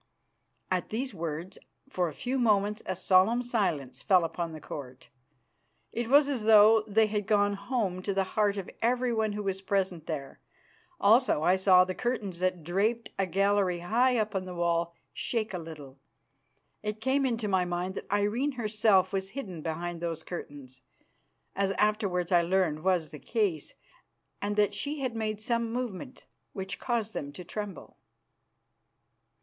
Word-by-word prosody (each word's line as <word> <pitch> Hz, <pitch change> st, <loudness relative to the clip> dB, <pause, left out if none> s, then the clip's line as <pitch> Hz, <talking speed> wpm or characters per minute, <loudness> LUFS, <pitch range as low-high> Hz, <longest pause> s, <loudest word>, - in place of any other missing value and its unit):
At 185 Hz, -1 st, 0 dB
these 250 Hz, +3 st, -3 dB
words 170 Hz, +2 st, -5 dB, 0.3 s
for 180 Hz, -10 st, -1 dB
a -, -, -9 dB
few 260 Hz, +2 st, -2 dB
moments 210 Hz, -2 st, +2 dB
a 185 Hz, -, -1 dB
solemn 190 Hz, +7 st, +3 dB
silence 155 Hz, -, -1 dB
fell 185 Hz, -4 st, +4 dB
upon 165 Hz, 0 st, -3 dB
the 155 Hz, -, -8 dB
Court. 130 Hz, -4 st, -9 dB, 0.8 s
It 235 Hz, 0 st, -3 dB
was 285 Hz, +3 st, +6 dB
as 255 Hz, -7 st, -2 dB
though 220 Hz, 0 st, +7 dB
they 220 Hz, +1 st, +4 dB
had 210 Hz, -1 st, -2 dB
gone 205 Hz, -1 st, +3 dB
home 200 Hz, -3 st, -2 dB
to 200 Hz, -, -2 dB
the 195 Hz, 0 st, +1 dB
heart 205 Hz, -1 st, +2 dB
of 195 Hz, -, -4 dB
everyone 235 Hz, -3 st, +1 dB
who 210 Hz, 0 st, -4 dB
was 195 Hz, -1 st, -2 dB
present 190 Hz, -4 st, -1 dB
there. 135 Hz, -1 st, -5 dB, 0.6 s
Also 220 Hz, -, +4 dB
I 180 Hz, +3 st, +5 dB
saw 185 Hz, -1 st, +6 dB
the 185 Hz, -, -3 dB
curtains 210 Hz, -6 st, -3 dB
that 185 Hz, -2 st, 0 dB
draped 210 Hz, +8 st, 0 dB
a 195 Hz, -, +1 dB
gallery 195 Hz, -1 st, +2 dB
high 245 Hz, +7 st, +2 dB
up 215 Hz, -1 st, 0 dB
in 190 Hz, -1 st, -2 dB
the 180 Hz, -1 st, -7 dB
wall 170 Hz, 0 st, 0 dB, 0.2 s
shake 220 Hz, -3 st, -2 dB
a 180 Hz, -, -2 dB
little. 150 Hz, -5 st, -10 dB, 0.8 s
It 210 Hz, 0 st, -4 dB
came 265 Hz, +4 st, +1 dB
into 230 Hz, -4 st, 0 dB
my 190 Hz, -2 st, +2 dB
mind 180 Hz, +1 st, -2 dB
that -, -, -8 dB
Irene 210 Hz, +8 st, +1 dB
herself 210 Hz, -5 st, +2 dB
was 190 Hz, 0 st, -2 dB
hidden 195 Hz, -, -6 dB
behind 170 Hz, +1 st, -4 dB
those 165 Hz, -2 st, -3 dB
curtains, 140 Hz, -7 st, -8 dB, 0.7 s
as 195 Hz, 0 st, +1 dB
afterwards 200 Hz, -5 st, 0 dB
I 175 Hz, -1 st, +6 dB
learned 170 Hz, -3 st, +1 dB
was 180 Hz, -4 st, +1 dB
the 150 Hz, -, -9 dB
case, 205 Hz, -, -1 dB, 0.7 s
and 205 Hz, 0 st, -1 dB
that 205 Hz, -1 st, +2 dB
she 285 Hz, +8 st, -3 dB
had 255 Hz, -3 st, -2 dB
made 215 Hz, -2 st, -2 dB
some 230 Hz, +1 st, -1 dB
movement 245 Hz, 0 st, -5 dB, 0.3 s
which 195 Hz, 0 st, -5 dB
caused 230 Hz, -3 st, -2 dB
them 140 Hz, -1 st, -4 dB
to 180 Hz, -, -8 dB
tremble. 205 Hz, +2 st, -7 dB
200 Hz, 165 wpm, -29 LUFS, 175-220 Hz, 0.8 s, though